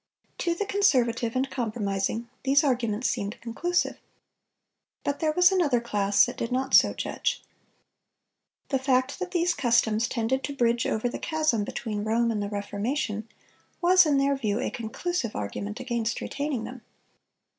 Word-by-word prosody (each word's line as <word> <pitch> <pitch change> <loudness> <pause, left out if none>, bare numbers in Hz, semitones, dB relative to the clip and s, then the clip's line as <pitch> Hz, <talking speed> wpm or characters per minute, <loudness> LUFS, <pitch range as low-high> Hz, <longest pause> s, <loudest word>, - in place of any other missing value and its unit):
To 340 -1 0
the 410 - -2
conservative 245 - +2
and 260 +1 +1
compromising, 220 -3 -2
these 275 +2 +4
arguments 245 -4 0
seemed 210 -3 -3
conclusive. 350 +10 -1 1.0
But 285 0 -2
there 315 -2 +1
was 360 +3 +5
another 315 -10 +2
class 205 -3 +3
that - - -7
did 230 - -3
not 260 +1 -1
so - - +6
judge. - - -2 1.3
The 270 - +1
fact 260 +2 +1
that 370 -1 -3
these 350 0 +1
customs 230 -4 +2
"tended 255 +2 -1
to 285 - -5
bridge 235 -2 +1
over 220 +3 0
the 240 - -4
chasm 310 -9 0
between 210 0 -4
Rome 230 +2 +1
and 210 -2 -2
the 200 - -3
Reformation,"(430) 210 +2 -3 0.5
was 365 -1 +6
in 290 -2 +3
their 275 0 +2
view 215 -5 -1
a - - -2
conclusive 235 +3 -3
argument 200 - -4
against 235 -3 -2
retaining 285 -5 -3
them. 250 +1 -8
245 Hz, 155 wpm, -27 LUFS, 220-285 Hz, 1.3 s, so